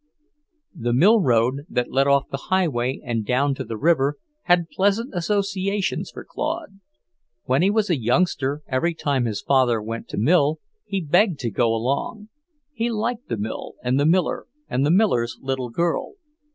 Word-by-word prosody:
The 120 0 -2
mill 200 - +5
road, 125 -2 +2
that 125 0 -1
led 135 +1 +2
off 140 0 +3
the 135 - -5
highway 135 -9 +1
and 115 -3 -1
down 135 +5 +1
to 135 - -5
the 115 -2 -6
river, 145 0 +2 0.3
had 175 -2 +3
pleasant 205 +6 +1
associations 195 +1 -1
for - - -10
Claude. 315 - -4 0.6
When 130 +4 +1
he 190 - +4
was 210 0 +1
a 155 - +1
youngster, 145 +2 0
every 155 +6 0
time 140 -5 0
his 110 -3 -3
father 130 -4 +3
went 115 +2 -6
to - - -7
mill, 150 - +3 0.3
he 195 -1 -2
begged 175 +3 +3
to 120 -3 -2
go 120 +4 +2
along. 135 - -2 0.4
He 235 -2 -1
liked 235 +2 -3
the 115 - -1
mill 105 +2 -5
and 125 +2 +1
the 145 - +3
miller 175 +1 +1 0.2
and 130 - 0
the 145 - +2
miller's 165 - +2
little 130 -2 -3
girl. 170 - -1
145 Hz, 170 wpm, -23 LUFS, 125-190 Hz, 0.6 s, mill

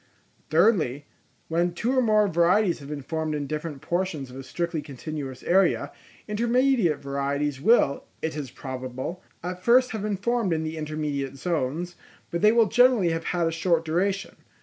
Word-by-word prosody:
Thirdly, 155 - +3 0.4
when 170 +1 0
two 245 +8 0
or 260 - +4
more 215 -3 +4
varieties 180 +2 +3
have 140 -1 -10
been 145 -2 -5
formed 160 +1 -2
in 145 -1 -2
different 150 -1 -5
portions 170 -7 -2
of - - -11
a 135 - -6
strictly 165 +4 -3
continuous 140 -1 -7
area, 190 +2 +2 0.4
intermediate 235 - +2
varieties 140 0 -2
will, 205 -10 +3
it 160 -1 -3
is 145 -4 -5
probable, 130 +6 -6 0.2
at 180 +1 -5
first 250 +5 +4
have 220 -2 -4
been 205 -1 -1
formed 230 -2 0
in 160 0 -1
the 160 0 -4
intermediate 150 -3 -3
zones, 170 +2 -2 0.3
but 170 - -2
they 210 +1 +6
will 230 0 +5
generally 245 -5 +4
have 165 0 -2
had 175 -2 0
a 165 - +1
short 165 0 +1
duration. 195 +5 -1
165 Hz, 170 wpm, -26 LUFS, 145-200 Hz, 0.4 s, they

